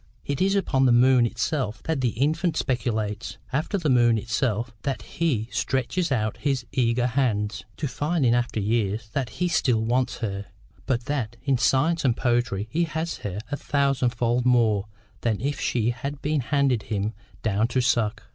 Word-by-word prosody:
It 140 +2 -2
is 195 +1 +3
upon 135 -9 +2
the - - +5
moon 125 0 +5
itself 120 -1 -2
that 160 -4 -1
the 125 - +2
infant 160 +4 +1
speculates, 115 -4 -2 0.2
after 155 +9 0
the 170 -5 -2
moon 120 -4 +4
itself—that 115 +3 -2
he 135 -10 -1
stretches 130 - -1
out 110 -4 0
his 135 -4 -1
eager 120 +2 +1
hands—to 105 -3 -1
find 145 +3 0
in 120 - +4
after 120 -2 0
years 110 0 0
that 135 -4 -1
he 180 - -1
still 125 -9 +2
wants 125 +2 0
her, 100 -3 -4 0.4
but 120 -2 0
that 130 -6 -2
in 135 -3 +1
science 160 +7 +2
and 125 -4 +2
poetry 120 -5 0
he 170 +2 +1
has 160 +1 -3
her 100 -2 -5
a 145 - -1
thousand 140 -4 +1
fold 120 +1 0
more 115 -5 +3 0.3
than 110 -3 0
if 140 +4 -2
she 120 -1 +1
had 140 +4 -5
been 150 -1 +1
handed 135 -3 +1
him 105 +1 -1 0.3
down 110 +1 +2
to 125 +2 0
suck. 115 -3 +1
125 Hz, 170 wpm, -25 LUFS, 110-140 Hz, 0.4 s, the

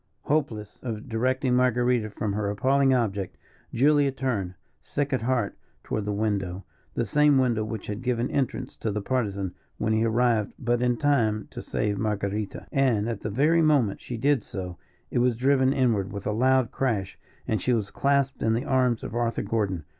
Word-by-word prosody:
Hopeless 115 -9 -1
of 115 -1 -5
directing 130 +3 0
Marguerita 125 -2 +2
from 105 0 -3
her 105 0 -1
appalling 135 +6 +2
object, 100 -7 0 0.3
Julia 140 +2 +3
turned, 115 -9 -2 0.3
sick 145 -1 -2
at 130 - +1
heart, 120 -3 0 0.3
toward 105 - -3
the 105 - -1
window 100 -3 -2 0.3
the 120 - 0
same 150 +5 +4
window 120 -4 +2
which 110 -1 -5
had 105 +2 -5
given 125 -1 0
entrance 135 -4 -2
to 110 - -2
the 105 0 -3
Partisan, 100 -7 -1 0.2
when 110 0 0
he 110 +1 +2
arrived 115 -2 +2
but 120 -1 0
in 125 -1 +2
time 110 -8 +1
to - - -6
save 105 -2 -2
Marguerita 105 -1 -2
and 120 -6 +2
at 115 -4 -3
the 110 - -3
very 150 +10 +3
moment 145 -10 +2
she 120 - -5
did 140 +1 +2
so, 90 -4 -6 0.3
it - - +1
was 120 -2 +2
driven 130 +1 +3
inward 115 -8 +1
with 100 -1 -6
a - - 0
loud 130 +2 +2
crash, 110 -8 -2 0.3
and 110 -4 0
she 125 - +1
was 110 -4 0
clasped 140 -1 +1
in 110 - +2
the 120 +5 -1
arms 130 -5 +1
of - - -6
Arthur 120 0 -1
Gordon. 100 -6 -1
115 Hz, 185 wpm, -26 LUFS, 105-130 Hz, 0.3 s, same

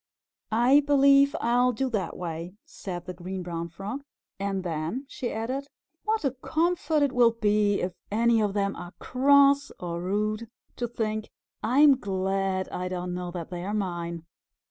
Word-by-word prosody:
"I 245 +6 +5
believe 280 0 +5
I'll 245 +2 +3
do 265 +4 -1
that 195 -7 -2
way," 170 +1 -5
said 175 -3 -7
the 180 - -5
Green 185 +1 -6
Brown 170 -1 -4
Frog. 195 +10 -6 0.4
"And 195 -1 -2
then," 170 - -3
she 250 -3 -4
added, 255 +6 -3 0.4
"what 435 -6 0
a 270 - +2
comfort 315 +3 0
it 280 - +2
will 240 -2 +4
be 210 -2 +2
if 180 0 -2 0.2
any 230 +1 +3
of 205 -1 0
them 200 -1 0
are 175 +1 -9
cross 280 +2 +4
or 170 -1 -4
rude, 215 +4 -1 0.3
to 240 - -1
think, 220 -2 -3 0.3
'I'm 275 +4 +5
glad 190 -2 -1
I 180 0 -3
don't 180 -1 -3
know 180 0 -4
that 175 0 -6
they 175 -1 -4
are 205 +3 -2
mine.'" 170 -4 -3
210 Hz, 165 wpm, -27 LUFS, 180-260 Hz, 0.4 s, I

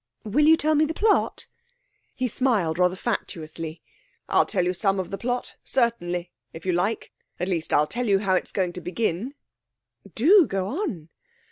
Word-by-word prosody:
'Will 280 +8 +2
you 320 0 +7
tell 310 0 +2
me 305 0 +4
the 315 +1 -1
plot?' 425 0 +1 0.7
He 255 - -1
smiled 210 -10 0
rather 180 0 +3
fatuously. 165 -6 -4 0.5
'I'll - - +3
tell 185 -4 0
you 180 - +1
some 195 +1 +1
of 185 - -4
the 195 - -3
plot, 245 +1 -2
certainly, 180 -8 -1 0.2
if 165 +1 -10
you 185 - +2
like 200 +6 -1 0.3
at 180 - -1
least, 170 -4 -2
I'll 150 - +4
tell 240 +9 -3
you 200 -2 +4
how 195 -1 0
it's 185 - 0
going 185 -3 -1
to 180 - -7
begin.' 215 - -2 0.8
'Do 345 - +6
go 195 -1 -2
on!' 205 - -4
195 Hz, 175 wpm, -25 LUFS, 175-250 Hz, 0.8 s, you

